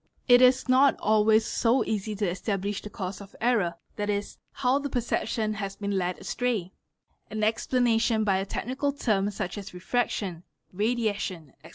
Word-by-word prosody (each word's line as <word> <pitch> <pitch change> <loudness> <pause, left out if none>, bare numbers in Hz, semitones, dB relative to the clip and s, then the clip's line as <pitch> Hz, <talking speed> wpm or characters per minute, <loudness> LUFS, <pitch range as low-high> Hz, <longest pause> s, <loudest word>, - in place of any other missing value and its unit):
It 245 -1 +7
is 255 +1 +5
nol 265 +2 +5
always 215 +1 +4
so 240 +3 +2
easy 215 0 -2
to 205 -1 -1
establish 195 +2 -2
the 210 - -8
cause 190 -1 -5
of 195 - -13
error, 215 -8 +1 0.2
7.e., 205 0 -2 0.2
how 260 +1 +1
the 285 0 -4
perception 225 -3 -1
ha 205 -2 -3
been 200 -1 -2
led 180 -1 -1
astray; 225 -8 -2 0.6
an 215 0 -3
explanation 225 0 +2
by 195 -3 +2
a 195 - -1
technical 265 +7 -2
term 210 -7 +1
such 200 -1 -4
as 195 -2 -9
refraction 190 -3 -2 0.3
radiation, 205 - -1
etc. 155 - -14
215 Hz, 160 wpm, -27 LUFS, 195-245 Hz, 0.6 s, It